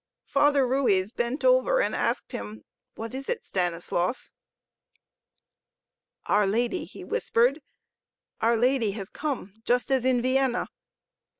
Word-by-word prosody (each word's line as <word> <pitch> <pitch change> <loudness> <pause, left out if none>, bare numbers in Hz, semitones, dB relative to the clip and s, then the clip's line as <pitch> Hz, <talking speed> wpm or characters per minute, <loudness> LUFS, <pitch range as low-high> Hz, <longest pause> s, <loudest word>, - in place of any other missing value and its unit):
Father 285 -1 +3
Ruiz 230 -7 +1
bent 240 - -2
over - - +4
and - - +1
asked - - -1
him: 105 +1 -7 0.3
What 225 +2 -6
is 270 +1 -6
it, 485 - -2
Stanislaus? 175 +4 -2 1.9
"Our 205 -1 +3
Lady!" 240 - 0
he - - -11
whispered. 275 - +1 0.8
"Our 230 +1 +3
Lady 240 -3 +2
has 195 -2 -7
come, 280 -10 -4
just 245 +3 +1
as 265 -2 +2
in 255 -1 +3
Vienna." 260 -1 +1
245 Hz, 120 wpm, -26 LUFS, 205-275 Hz, 1.9 s, over